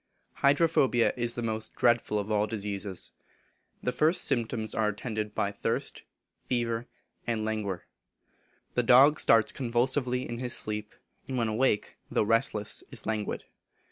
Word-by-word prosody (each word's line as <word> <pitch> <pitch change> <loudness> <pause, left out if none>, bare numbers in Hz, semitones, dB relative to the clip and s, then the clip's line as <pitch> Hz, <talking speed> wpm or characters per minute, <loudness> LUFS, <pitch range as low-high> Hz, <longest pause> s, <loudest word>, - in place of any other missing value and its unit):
Hydrophobia 140 -4 +3
is 120 -1 -1
the 120 - -3
most 110 -1 -3
dreadful 120 -3 +2
of 105 +1 -3
all 105 0 +2
diseases. 100 -3 -5 0.7
The 125 - 0
first 155 +6 +3
symptoms 115 -4 0
are 110 -1 +1
attended 105 0 -4
by 100 -2 0
thirst, 100 - -3 0.4
fever, 120 -1 -2 0.4
and 110 -2 -1
languor. 105 -4 -3 0.9
The 125 - +2
dog 130 +5 +6
starts 115 -1 +5
convulsively 125 +1 0
in 120 0 -5
his 125 -1 +1
sleep, 105 0 -4 0.3
and 130 - -3
when 115 -2 +1
awake, 110 -1 0
though - - +1
restless, 110 -1 0
is - - -2
languid. 110 -2 -2
115 Hz, 140 wpm, -28 LUFS, 105-125 Hz, 0.9 s, dog